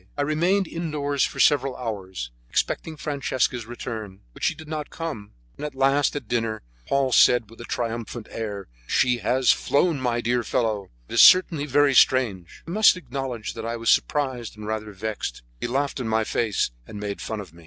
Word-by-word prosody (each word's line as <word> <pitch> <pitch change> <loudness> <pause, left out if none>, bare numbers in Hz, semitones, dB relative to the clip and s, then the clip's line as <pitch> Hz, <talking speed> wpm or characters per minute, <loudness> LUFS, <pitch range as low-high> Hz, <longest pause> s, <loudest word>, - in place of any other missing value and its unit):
I 145 - +1
remained 175 +6 +1
indoors 150 -5 -1
for - - -7
several 135 -3 +3
hours, 95 - -5 0.2
expecting 160 -1 -1
Francesca's 130 -5 -1
return, 110 -5 -7
but - - -14
she - - +2
did 155 - -11
not 150 -1 -4
come, 145 -12 -6 0.2
and - - -8
at 150 -2 -5
last, 135 +2 +2
at 140 -6 -5
dinner, 115 -2 -1 0.2
Paul 140 -1 +1
said 120 -2 +5
with 115 - -12
a - - -7
triumphant 115 -1 -4
air: 105 -3 -5 0.2
"She 125 -1 +2
has 125 +4 +3
flown, 150 +1 +1
my 120 -2 0
dear 120 +1 0
fellow; 110 -5 -1 0.2
it - - -9
is - - +6
certainly 165 -5 +6
very 145 0 +4
strange." 110 -10 +2
I - - -5
must 210 -1 +5
acknowledge 130 -8 -5
that - - -7
I 115 +1 -3
was 115 0 +2
surprised 130 -7 0
and 105 - -8
rather 110 0 -3
vexed. 105 - -5 0.2
He - - -2
laughed 140 +3 -1
in 125 - -3
my 110 0 +2
face, 110 - 0 0.2
and 105 - -8
made 100 -1 -4
fun 110 - -4
of 95 -6 -9
me. 85 - -16
120 Hz, 190 wpm, -24 LUFS, 110-145 Hz, 0.2 s, is